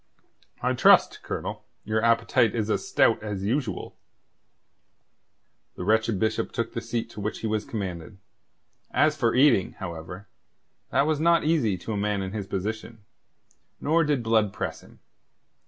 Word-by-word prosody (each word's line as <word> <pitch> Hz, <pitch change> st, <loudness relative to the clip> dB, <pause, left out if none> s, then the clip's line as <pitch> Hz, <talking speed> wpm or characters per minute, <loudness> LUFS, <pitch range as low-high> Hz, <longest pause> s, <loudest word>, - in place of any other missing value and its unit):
"I -, -, +2 dB
trust, -, -, +5 dB
Colonel, -, -, -5 dB, 0.2 s
your 110 Hz, +1 st, -1 dB
appetite 115 Hz, -1 st, +3 dB
is 110 Hz, -2 st, -1 dB
as -, -, -1 dB
stout -, -, +3 dB
as 105 Hz, -3 st, -4 dB
usual." 115 Hz, -3 st, -2 dB, 1.8 s
The -, -, -6 dB
wretched 110 Hz, +1 st, +2 dB
Bishop 110 Hz, +3 st, -1 dB
took 115 Hz, -2 st, -3 dB
the 115 Hz, -, -3 dB
seat 115 Hz, 0 st, -3 dB
to 105 Hz, -, -8 dB
which 105 Hz, +2 st, -4 dB
he -, -, -4 dB
was 110 Hz, -1 st, -1 dB
commanded. 95 Hz, -3 st, -5 dB, 0.7 s
As 155 Hz, -1 st, +2 dB
for 120 Hz, -6 st, +1 dB
eating, 130 Hz, -8 st, +4 dB
however, 90 Hz, +1 st, -8 dB, 0.6 s
that 140 Hz, -, +2 dB
was 155 Hz, -1 st, 0 dB
not 170 Hz, +1 st, +4 dB
easy 150 Hz, -, +1 dB
to 110 Hz, -, -5 dB
a -, -, -2 dB
man 100 Hz, -1 st, -1 dB
in 95 Hz, -, -5 dB
his 105 Hz, -3 st, -4 dB
position; 105 Hz, +2 st, -5 dB, 0.7 s
nor 165 Hz, +3 st, +2 dB
did 145 Hz, -5 st, 0 dB
Blood 110 Hz, -3 st, +2 dB
press -, -, -5 dB
him. -, -, -19 dB
110 Hz, 155 wpm, -26 LUFS, 100-120 Hz, 1.8 s, trust